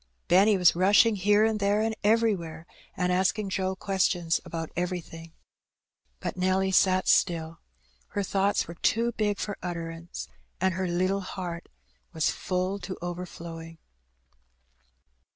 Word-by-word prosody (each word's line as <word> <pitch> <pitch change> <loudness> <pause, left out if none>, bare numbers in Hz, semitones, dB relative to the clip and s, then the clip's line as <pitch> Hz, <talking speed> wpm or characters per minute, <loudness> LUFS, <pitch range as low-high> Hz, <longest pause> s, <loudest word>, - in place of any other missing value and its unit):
Benny 195 +3 +5
was 180 -3 +5
rushing 205 +5 +5
here 205 +2 +3
and 220 -1 0
there 205 +1 +2
and 220 0 0
everywhere^ 200 -7 +1 0.3
and 180 -1 +1
asking 190 +2 +1
Joe 190 0 -1
questions 185 -3 0
about 165 -1 -5
everything. 170 -2 -4 0.9
But - - -4
Nelly 190 +1 +1
sat 185 0 +3
still. 165 -2 +2 0.5
Her 205 - -2
thoughts 195 +1 +1
were 170 - -7
too 230 +7 +1
big 210 -3 -1
for 205 - -4
utterance^ 165 -1 -6 0.3
and 190 +1 +1
her 185 +1 -2
little 185 +3 0
heart 180 -2 -6 0.4
was 160 - +1
full 185 +2 -2
to 185 0 -6
overflowing. 170 -2 -7
185 Hz, 130 wpm, -27 LUFS, 170-200 Hz, 0.9 s, Benny